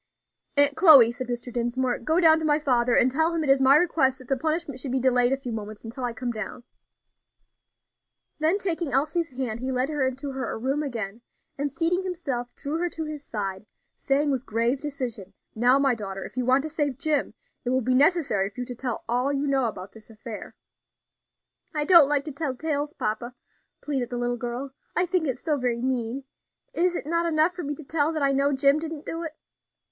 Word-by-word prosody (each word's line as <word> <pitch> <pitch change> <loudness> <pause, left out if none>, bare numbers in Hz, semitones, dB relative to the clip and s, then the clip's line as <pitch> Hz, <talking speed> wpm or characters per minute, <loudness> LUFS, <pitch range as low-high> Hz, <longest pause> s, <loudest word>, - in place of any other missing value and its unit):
"Aunt 285 0 +4
Chloe," 280 -10 +8
said 255 +1 -6
Mr. 240 0 -5
Dinsmore, 245 +1 -1
"go 315 +8 +1
down 320 -2 +6
to - - -5
my 295 -1 +3
father, 250 -5 +2
and 255 - +4
tell 320 +5 +1
him 325 - 0
it 275 - +3
is 270 0 +4
my 265 +1 +6
request 300 -5 +3
that 255 -2 -13
the 270 - +3
punishment 310 -1 -2
should 260 0 -4
be 265 - +1
delayed 250 -1 +3
a 270 - +2
few 260 -3 -6
moments 215 0 -7
until 235 +3 -7
I 245 - -1
come 240 +1 -4
down." 220 +2 -6 1.8
Then 320 +5 +2
taking 345 -6 -2
Elsie's 300 +1 0
hand, 235 -4 -2
he 260 +2 -3
led 255 +2 0
her 295 -3 -1
into 270 +2 -4
her 265 -2 -4
room 270 +6 -1
again, 230 -6 -4 0.3
and 285 0 -2
seating 335 +6 +1
himself, 285 -10 -4
drew 300 +3 -3
her 350 0 0
to 325 - -5
his 305 -2 -6
side, 195 -3 -5 0.3
saying, 285 +1 +1
with 260 -2 -1
grave 235 +5 +1
decision, 240 -10 -5 0.2
"Now, 245 +4 +4
my 275 -2 +3
daughter, 195 -4 -5
if - - -11
you 255 -1 -2
want 260 +2 +4
to 315 - -4
save 290 -4 -1
Jim, 300 0 -1 0.3
it 245 - -2
will 260 +1 +2
be 255 +2 +1
necessary 275 - +3
for 220 +5 -8
you - - -3
to 250 - -6
tell 245 -1 -4
all 250 +4 +1
you 280 0 -1
know 270 -2 +1
about 200 -4 -5
this 220 0 -16
affair." 225 0 -9 1.2
"I 300 -1 0
don't 330 -4 +8
like 290 -1 +2
to 305 - -4
tell 280 -2 -3
tales, 295 +1 -2
papa," 230 +3 -3 0.5
pleaded 270 -5 -2
the 245 - -4
little 245 0 -1
girl; 245 +3 -5 0.2
"I 360 - +3
think 355 -2 0
it 260 -2 -1
so 300 0 -1
very 245 -1 -1
mean. 255 0 -2 0.5
Is 355 -4 +1
it - - -4
not 335 +2 0
enough 320 +2 +3
for 355 - -6
me 295 -2 -3
to 315 - -9
tell 300 +1 0
that 310 -2 -1
I 275 - +3
know 275 +1 +2
Jim 275 +2 +3
didn't 315 -1 -6
do 330 - -4
it?" 315 -2 -6
270 Hz, 215 wpm, -25 LUFS, 245-305 Hz, 1.8 s, Chloe